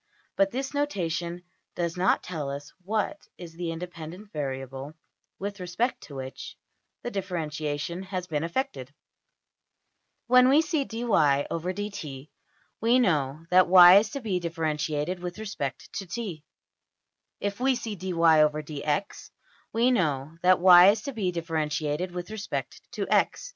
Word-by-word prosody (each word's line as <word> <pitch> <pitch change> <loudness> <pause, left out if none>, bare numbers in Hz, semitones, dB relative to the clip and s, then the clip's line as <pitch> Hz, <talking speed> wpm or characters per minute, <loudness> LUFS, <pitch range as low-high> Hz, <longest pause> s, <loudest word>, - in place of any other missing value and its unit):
But 295 0 +3
this 270 +1 -4
notation 175 - -2 0.3
does 170 -1 -2
not 180 +1 +2
tell 155 -6 -4
us 140 +1 -7
what 215 +9 -1 0.2
is 170 -2 -10
the 170 0 -4
independent 175 +3 -8
variable 135 -1 -5 0.4
with 200 +1 -5
respect 180 +8 -2
to 145 - -11
which 130 0 -7 0.5
the 240 - -4
differentiation 170 -3 -3
has 185 -1 -4
been 155 -3 -2
effected. 165 - -3 1.3
When 250 +1 +6
we 295 +4 +5
see 310 -3 -1
$\dfrac{dy}{dt}$ 180 - -1 0.5
we 235 +3 +4
know 155 - +1
that 185 0 +6
$y$ 180 +1 +9
is 210 +1 -2
to 280 +3 -5
be 200 -6 -1
differentiated 160 0 -2
with 180 +1 -6
respect 145 - -5
to~$t$. 195 -4 -5 1.0
If 200 +1 -3
we 260 +1 +2
see 230 -3 -5
$\dfrac{dy}{dx}$ 155 -3 +1 0.4
we 235 +3 +3
know 155 - 0
that 185 0 +5
$y$ 180 +1 +9
is 210 0 -4
to 280 - -5
be 200 -6 -1
differentiated 160 0 -2
with 180 +3 -6
respect 215 -1 -5
to~$x$. - - 0
180 Hz, 130 wpm, -27 LUFS, 155-205 Hz, 1.3 s, $y$